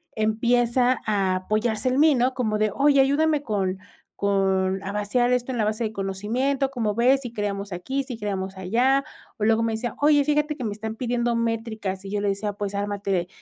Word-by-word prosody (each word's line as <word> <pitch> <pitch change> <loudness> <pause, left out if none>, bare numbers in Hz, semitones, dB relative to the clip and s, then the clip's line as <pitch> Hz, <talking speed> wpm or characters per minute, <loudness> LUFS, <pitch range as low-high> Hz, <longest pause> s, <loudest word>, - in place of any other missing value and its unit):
empieza 240 +3 +2
a 195 -3 +1
apoyarse 215 +5 0
en 260 +2 +1
mí, 310 -1 +6
¿no?, 250 +1 +2
como 215 -4 0
de: 215 -1 +2
"Oye, 280 -1 +5
ayúdame 295 +2 +2
con 195 -6 -1 0.4
con 195 -1 +1
a 195 - -4
vaciar 210 +4 +1
esto 250 +1 -1
en - - -3
la 220 - +1
base 215 +2 -1
de 215 - -4
conocimiento, 225 +8 -1
¿cómo 225 -5 -1
ves?, 260 +3 +4
¿sí 245 -3 -7
creamos 200 -2 -3
aquí, 265 +11 -3
sí 250 -4 -7
creamos 195 -2 -3
allá? 245 +9 +2 0.4
O 210 - +1
luego 225 +1 +3
me 225 - 0
decía: 235 +2 -3
"Oye, 290 -1 +5
fíjate 300 +1 +1
que 255 - -5
me 210 - -2
están 220 +1 -5
pidiendo 240 -1 -1
métricas". 225 -4 -3
Y 195 - -6
yo 205 0 -1
le 205 - 0
decía: 205 +1 -2
"Pues, 205 0 -4
ármate 200 -3 -1
220 Hz, 200 wpm, -24 LUFS, 200-250 Hz, 0.4 s, mí